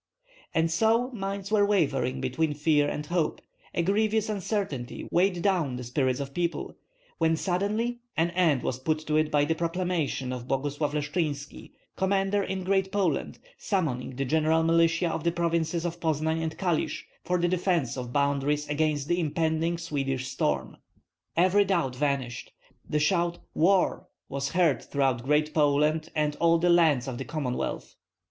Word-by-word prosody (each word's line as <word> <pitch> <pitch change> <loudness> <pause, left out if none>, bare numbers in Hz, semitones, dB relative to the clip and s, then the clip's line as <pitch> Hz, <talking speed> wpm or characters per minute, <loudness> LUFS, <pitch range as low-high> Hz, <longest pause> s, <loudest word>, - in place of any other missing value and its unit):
And 165 0 +2
so 230 +8 +2
minds 200 -2 -4
were 210 -2 +4
wavering 140 -10 +1
between 145 +4 -1
fear 150 -1 +2
and 150 - -4
hope; 170 0 -1 0.4
a 170 - +1
grievous 215 +3 +1
uncertainty 195 - -3
weighed 180 0 +2
down 175 -10 +1
the 125 - -5
spirits 130 +1 0
of 140 -1 -5
people, 175 +1 -2 0.4
when 165 -1 +3
suddenly 205 +8 -1 0.2
an 170 +1 +2
end 170 -7 +2
was 130 - -2
put 155 +4 0
to 150 - 0
it 155 0 +2
by 145 -1 +3
the 160 - +1
proclamation 165 -6 -1
of 125 -1 -6
Boguslav 145 +2 -1
Leshchynski, 150 -1 -3 0.2
commander 195 +1 +1
in 190 -1 -3
Great 190 0 +1
Poland, 200 -2 0 0.2
summoning 145 - -1
the 135 +2 -2
general 160 +3 +2
militia 165 +1 +3
of 160 -2 -3
the 170 - +2
provinces 170 0 0
of 170 0 -3
Poznan 160 0 0
and 160 -1 -3
Kalisk 175 -5 -1 0.2
for 180 - 0
the 175 0 +1
defence 175 -7 0
of 125 -2 -4
the - - -9
boundaries 145 +1 +1
against 150 -1 0
the 175 +1 +1
impending 160 +1 0
Swedish 135 -5 -2
storm. 135 - -1 0.6
Every 185 +4 +5
doubt 170 -10 0
vanished. 130 -3 -2 0.4
The 150 - +1
shout, 170 +2 +1 0.2
"War!" 185 +3 +2 0.2
was 140 +1 -3
heard 170 -6 +3
throughout 135 -4 0
Great 150 +3 +1
Poland 150 +1 +2
and 150 -1 0
all 170 0 +4
the 175 +1 +3
lands 155 -7 +4
of 125 -2 -4
the 135 - -4
Commonwealth. 140 -6 -3
160 Hz, 160 wpm, -27 LUFS, 145-180 Hz, 0.6 s, Every